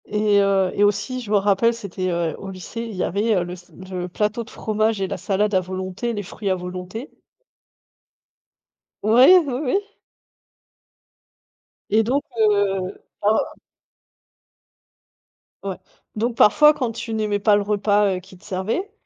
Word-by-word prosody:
Et 210 -1 +2
heu, 195 -2 +2
et 205 - +2
aussi, 210 +5 0
je 225 - -9
me - - +4
rappelle, 205 +4 +3
c'était, 190 -4 -4
heu, 170 -2 -1
au 195 - -7
lycée, 190 +4 -7
il 230 -3 -6
y 180 - -1
avait, 210 +4 +1
heu, 180 - +1
le 175 0 -6
s 180 -1 -14 0.2
le 180 -1 -3
plateau 210 +5 -1
de 225 - -16
fromages 215 -1 -1
et 190 - 0
la - - -4
salade 200 +3 0
à 190 - +4
volonté, 185 +5 -4
les 205 -2 -4
fruits 200 +2 -5
à 190 - +2
volonté. 180 - -7 1.9
Ouais, 245 - +7
oui, 265 - -2
oui. 330 +10 +2 2.1
Et 220 +2 +3
donc 265 +6 0 0.2
heu, 200 -3 +2 0.3
en 210 +2 +3 2.3
Ouais, 195 -2 -4 0.4
donc 230 +2 -1
parfois, 300 +7 +6
quand 250 -5 -2
tu 225 0 -6
n'aimais 215 -2 0
pas 205 0 +4
le 205 - +2
repas, 205 -1 +2
heu, - - -4
qu'ils 185 0 -16
te - - -24
servaient, 210 - -3
205 Hz, 155 wpm, -22 LUFS, 185-225 Hz, 2.3 s, Ouais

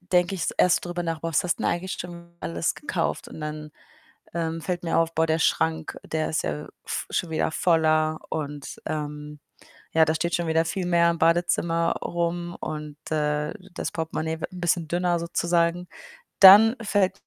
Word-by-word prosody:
denke 180 +1 +1
ich's 175 - -1
erst 180 - +3
drüber 175 0 -3
nach: 165 -2 -3
„Boah, 165 - -3
was 155 - +1
hast 175 - +1
denn - - -1
eigentlich 175 +2 -1
schon 170 -1 -9
alles 85 0 -1
gekauft?“ - - -3
Und - - -10
dann, 150 0 -5 0.6
ähm, 165 -1 -2
fällt 180 0 -3
mir 165 - 0
auf: 165 0 +1
„Boah, 160 0 +2
der 160 0 +1
Schrank, 160 -1 +1
der 155 0 -2
ist 155 - 0
ja 75 -1 -4 0.2
v - - -3
schon 175 - -1
wieder 160 - 0
voller 155 -2 +2
und, 145 -2 -5
ähm, 150 -1 -5 0.5
ja, 160 - +6
da 160 - +1
steht 170 +2 0
schon 170 -1 -2
wieder 160 +1 +2
viel 185 +2 -2
mehr 170 -1 +4
im 170 - -4
Badezimmer 170 0 +2
rum 175 0 -2
und, 150 -1 -6
äh, 150 0 0 0.2
das - - -4
Portemonnaie 160 0 -3
wird - - -4
'n 180 - -8
bisschen 170 -1 +1
dünner, 175 0 +1
sozusagen.“ 170 +1 0 0.6
Dann 210 +4 +10
fällt 195 -3 +1
165 Hz, 180 wpm, -25 LUFS, 155-175 Hz, 0.6 s, Dann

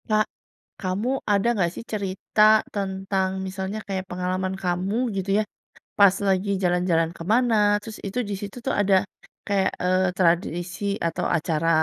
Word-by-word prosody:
Kak, 215 0 +3 0.6
kamu 190 +4 -1 0.2
ada 200 +2 +2
enggak 185 -6 +1
sih, - - -7
cerita 200 0 -1 0.3
tentang, 190 -1 -1 0.2
misalnya 190 +2 -4
kayak 190 -1 -3
pengalaman 185 +1 -2
kamu, 180 +3 -1 0.2
gitu 190 +1 -3
ya. - - 0 0.6
Pas 200 -2 +7
lagi 190 +1 +1
jalan-jalan 175 -2 +2
ke - - -7
mana, 240 0 +3 0.3
terus, 215 0 -8
itu 200 +5 -4
di 205 - -2
situ 200 +1 -7
tuh, 270 - +1
ada 200 -1 +3 0.5
kayak, 195 -2 +2
eee, 185 +1 +2
tradisi 175 +1 0 0.2
atau 165 - -2
acara, 160 0 -1
190 Hz, 145 wpm, -24 LUFS, 180-200 Hz, 0.6 s, Pas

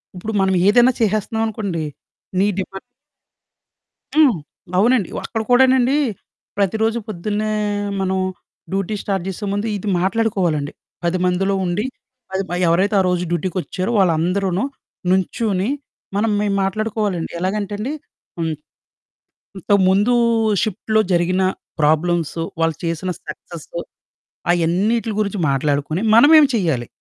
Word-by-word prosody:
ఇప్పుడు 215 +5 -5
మనం 190 0 +2
ఏదైనా 240 +4 +6
చేసేస్తున్నామనుకోండి. 215 -4 -1 0.6
నీ 200 - +4
డిమాండ్ 195 0 -5 1.4
హ్మ్. 290 -9 +6 0.4
అవునండి. 230 -2 +3 0.2
అక్కడ 225 -2 -2
కూడానండి. 260 +1 +5 0.6
ప్రతిరోజు 220 +4 +1
పొద్దున్నే 215 +2 -2 0.5
మనం 190 0 0 0.5
డ్యూటీ 195 +2 -1
స్టార్ట్ 195 -3 -2
జేసే 195 +2 -5
ముందు 205 +2 -1
ఇది 205 +2 -5
మాట్లాడుకోవాలండి. 185 -7 0 0.3
10 175 +2 +1
మందిలో 195 +2 +1
ఉండి 175 +5 -1 0.5
అది 190 +1 0
మ - - -3
ఎవరైతే 185 +5 +2
ఆ - - +5
రోజు 180 -1 +1
డ్యూటీకొచ్చారో 185 +3 -2
వాళ్ళందరూను 180 +2 +1 0.5
నుంచుని. 190 +2 +1 0.5
మనం 220 +2 +1
మె 210 - 0 0.2
మాట్లాడుకోవాలండి. 205 -2 -1
ఎలాగంటే 200 +2 -2
అండి 240 +7 -3 0.5
హ్మ్ 165 -1 -1 1.1
ఇంత 190 - -5 0.2
ముందు 205 +6 +3 0.5
షిఫ్ట్‌లో 220 +1 0
జరిగిన 175 +2 +2 0.4
ప్రాబ్లమ్సు, 165 +1 +1 0.2
వాళ్ళు 165 -2 +2
చేసిన 170 +2 -2 0.2
సక్సెసు 170 +2 -8 0.7
అయన్నిటిల 195 +7 +1
గురించి 205 -1 -1
మాట్లాడుకుని 145 +4 0
మనమేమి 290 +4 +8
చేయాలి. 160 - 0
195 Hz, 110 wpm, -20 LUFS, 175-215 Hz, 1.4 s, మనమేమి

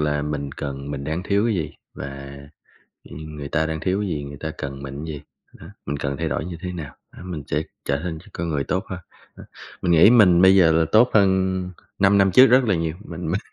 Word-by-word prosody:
là 75 -1 0
mình 75 -2 -4
cần 70 0 -6
mình 70 -1 -5
đang 80 +4 -3
thiếu 100 +2 +1
cái 115 - +1
gì 80 -5 -3 0.2
và 70 +1 -8 0.7
nh - - -15
nhưng 75 -1 -9
người 70 -1 -6
ta 80 +2 +1
đang 80 0 -3
thiếu 95 +4 -1
cái 100 - -2
gì, 75 -3 -3
người 70 0 -8
ta 80 - -4
cần 70 0 -6
mình 70 +3 -6
cái 80 - -5
gì, 70 - -8 0.4
đó, - - -11 0.2
mình 70 +1 -3
cần 70 -1 -3
thay 80 -1 -2
đổi 75 +4 -2
như 85 -2 -6
thế 90 - -4
nào, 80 -6 -7 0.2
đó, - - -10
mình 85 -5 -6
sẽ 75 +2 -1 0.2
trở 70 0 0
nên 80 -3 -4
ch - - -17
con 85 0 -3
người 70 -3 -1
tốt 95 +7 -2
hơn. 95 -1 -5 0.4
Đó, - - -12 0.4
mình 90 - +1
nghĩ 85 +6 +7
mình 95 -8 +6
bây 95 +1 +7
giờ 85 -4 +6
là 80 0 +3
tốt 120 +3 +5
hơn 95 -2 +2 0.4
5 100 +1 +4
năm 95 -1 +4
trước 130 +7 +8
rất 130 +1 +5
là 105 -5 +1
nhiều, 80 -1 -2
mình 85 0 -6
mình 95 - 0
80 Hz, 255 wpm, -22 LUFS, 70-95 Hz, 0.7 s, trước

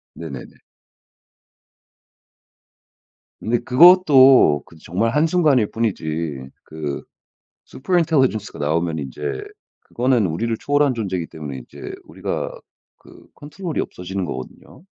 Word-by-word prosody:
네네네. - - -9 2.8
근데 115 +2 0
그것도 135 - +6
그 - - -18
정말 110 +7 -1
한순간일 150 - +3
뿐이지 80 - -3
그 75 -3 -6 0.6
super 175 +7 -2
intelligence가 135 - +1
나오면 80 +2 -1
인제 70 0 -8 0.6
그거는 120 -3 0
우리를 105 +8 -2
초월한 145 -2 +1
존재이기 95 -7 -3
때문에 75 -5 -8
인제 - - -10
우리가 - - -4 0.5
그 - - -18
control이 155 +2 -5
없어지는 95 +1 -5
거거든요. 65 - -9
110 Hz, 320 characters per minute, -21 LUFS, -, 2.8 s, 그것도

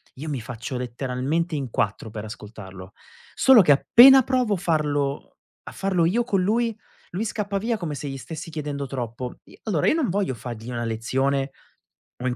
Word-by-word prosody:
io 150 +4 -6
mi 140 -4 -2
faccio 125 +2 -6
letteralmente 130 +7 -2
in 135 -4 -3
quattro 110 0 -2
per 105 0 -7
ascoltarlo. 100 -3 -10 0.4
Solo 265 -4 +7
che 160 -6 +4
appena 260 - +8
provo 250 -4 +1
a - - -4
farlo 145 -5 -1 0.3
a - - -8
farlo 185 -3 +1
io 220 +8 +2
con 205 -6 0
lui, 225 +4 +1 0.4
lui 185 +5 -2
scappa 205 -2 -2
via 225 +1 -1
come 170 -5 -4
se 145 - -6
gli 135 - -5
stessi 160 - -8
chiedendo 145 -3 -4
troppo. 125 -1 -5
I - - -18
Allora 180 -10 0
io - - +5
non 295 - 0
voglio 195 -6 0
fargli 115 0 -7
una 120 -1 -3
lezione 135 +5 -1 0.7
o 130 - 0
in 125 - -1
145 Hz, 185 wpm, -24 LUFS, 125-195 Hz, 0.7 s, appena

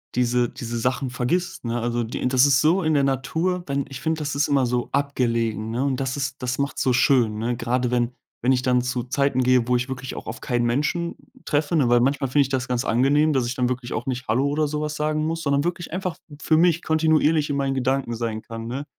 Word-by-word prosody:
diese 125 0 +2
diese 120 -1 -5
Sachen 130 +3 -1
vergisst, 130 +7 -2
ne? 120 +1 -1
Also, 120 0 -1
die 115 - -5
int 125 - 0
das 130 0 +5
ist 135 -2 +4
so 170 +5 +3
in 155 - +1
der 140 -2 +3
Natur 150 +8 -1
denn 140 0 -1
ich 135 - -7
finde, 160 +1 -1
das 145 -1 -3
ist 140 +1 +1
immer 140 -2 +2
so 120 0 -1
abgelegen, 115 -6 0
ne? 125 +3 -1
Und 135 -2 0
das 135 -1 -2
ist 135 -2 -4
das 125 0 -2
macht's 140 0 -2
so 130 - +2
schön, 120 -4 +3
ne? 120 +2 -2
Grade 125 +1 -1
wenn 120 0 0 0.3
wenn 125 +2 +2
ich 125 - +1
dann 125 -1 +2
zu 125 -1 -2
Zeiten 135 0 0
gehe, 125 -1 +3
wo 125 - +2
ich 125 +2 -1
wirklich 130 0 -5
auch - - -7
auf 115 +1 -6
keinen 120 -1 -1
Menschen 150 +8 -1 0.3
treffe, 150 +2 0
ne? 140 -7 +3
Weil 120 0 +5
manchmal 135 +2 +1
finde 145 +3 +4
ich 135 - -5
das 130 -2 -2
ganz 125 0 -1
angenehm, 145 +6 +3
dass 130 -3 +1
ich 120 - -3
dann 125 -1 +1
wirklich 125 -1 -4
auch 120 - -3
nicht 130 -1 -4
„hallo“ 130 +6 +2
oder 150 +1 0
so 150 0 -2
was 150 0 -3
sagen 155 0 -1
muss, 165 +1 -2
sondern 140 0 +1
wirklich 175 -1 -3
einfach 185 -1 -3 0.3
für 160 - +2
mich 170 0 +3
kontinuierlich 160 -1 +2
in 140 - -1
meinen 135 -1 0
Gedanken 130 -2 0
sein 115 -1 -3
kann, 115 0 -7
ne? 135 +4 -4
130 Hz, 250 wpm, -23 LUFS, 120-145 Hz, 0.3 s, das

